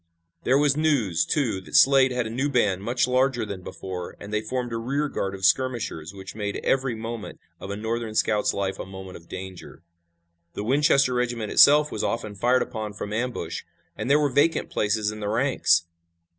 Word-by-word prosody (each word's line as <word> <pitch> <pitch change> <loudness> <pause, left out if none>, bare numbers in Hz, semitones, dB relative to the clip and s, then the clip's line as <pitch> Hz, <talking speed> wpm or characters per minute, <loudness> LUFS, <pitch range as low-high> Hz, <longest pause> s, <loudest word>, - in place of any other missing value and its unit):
There 130 - +4
was 145 -1 +3
news, 125 - +2
too, 115 -10 0
that - - -8
Slade 135 -1 +6
had 125 -1 -1
a - - -4
new 135 +5 -1
band 105 -8 +1
much 120 +5 0
larger 130 -1 +1
than 100 -3 -6
before, 90 -1 -7
and 105 +1 -9
they 105 - +1
formed 120 +1 -3
a - - -1
rear 140 +6 -1
guard 95 -8 -3
of 95 0 -3
skirmishers 105 -6 0
which 95 -1 -9
made 105 -1 -4
every 135 -3 +1
moment 115 0 -6 0.2
of - - -8
a 100 - -3
Northern 110 +1 -3
scout's 105 -1 +2
life 95 -1 -3
a - - -5
moment 95 -1 -9
of 85 - -19
danger. 95 -3 -9 0.7
The 100 - -4
Winchester 135 +1 +3
regiment 120 -3 -2
itself 150 +1 +6
was - - -3
often 110 -3 -2
fired 120 +6 +2
upon 110 -2 -6
from 105 +1 -6
ambush, 115 -8 -3 0.3
and - - -4
there 145 +2 +5
were 145 -2 +1
vacant 150 +4 +2
places 105 0 0
in 105 - -8
the 105 -1 -3
ranks. 115 -8 +2
115 Hz, 195 wpm, -25 LUFS, 100-130 Hz, 0.7 s, Slade